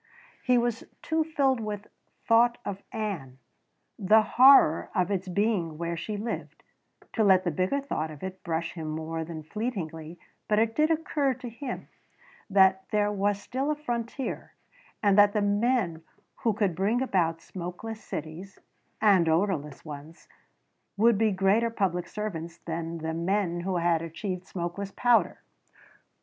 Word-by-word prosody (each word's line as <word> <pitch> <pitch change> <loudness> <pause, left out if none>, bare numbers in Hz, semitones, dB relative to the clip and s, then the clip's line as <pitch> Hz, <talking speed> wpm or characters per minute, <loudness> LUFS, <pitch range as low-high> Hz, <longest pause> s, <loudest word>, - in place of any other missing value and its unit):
He 250 -1 +3
was 235 -1 0 0.2
too 320 0 +1
filled 280 -5 +1
with 210 -2 -5 0.4
thought 235 +1 +5
of 200 -1 -4
Ann 190 - -4 0.6
the 215 +3 +5
horror 255 - +6
of 180 0 +1
its 190 -1 -1
being 180 -4 0
where 170 +1 -3
she 205 +5 -4
lived 225 +3 -5 0.5
to 225 - +2
let 190 -2 +5
the 175 - 0
bigger 185 - 0
thought 160 - -3
of 150 0 -11
it 190 0 -6
brush 165 -1 -2
him 160 -3 -6
more 160 +1 -3
than 160 -1 -7
fleetingly, 170 -5 -5 0.3
but 210 - +2
it 225 +1 +2
did 305 +1 +3
occur 300 -4 0
to 250 0 -8
him 245 +2 -6 0.6
that 190 -1 +4
there 210 -1 +1
was 205 0 0
still 260 +7 -3
a 305 - +1
frontier 240 -2 -4 0.5
and 205 -1 +5
that 205 0 +6
the 210 - +1
men 205 -5 +1 0.4
who 230 -4 +1
could 205 -4 0
bring 200 +7 +1
about 170 -9 +1
smokeless 185 +6 -7
cities 165 +6 -7 0.4
and 190 -6 +5
odorless 160 -5 0
ones 150 +2 -10 0.7
would 225 0 +4
be 220 -1 +3
greater 195 +4 +2
public 185 -6 -1
servants 170 -6 -5
than 165 0 -5
the 160 0 -3
men 175 +1 0
who 180 +1 -1
had 170 -1 +2
achieved 180 +3 -5
smokeless 180 +3 -4
powder. 240 +2 +2
195 Hz, 150 wpm, -28 LUFS, 170-225 Hz, 0.7 s, horror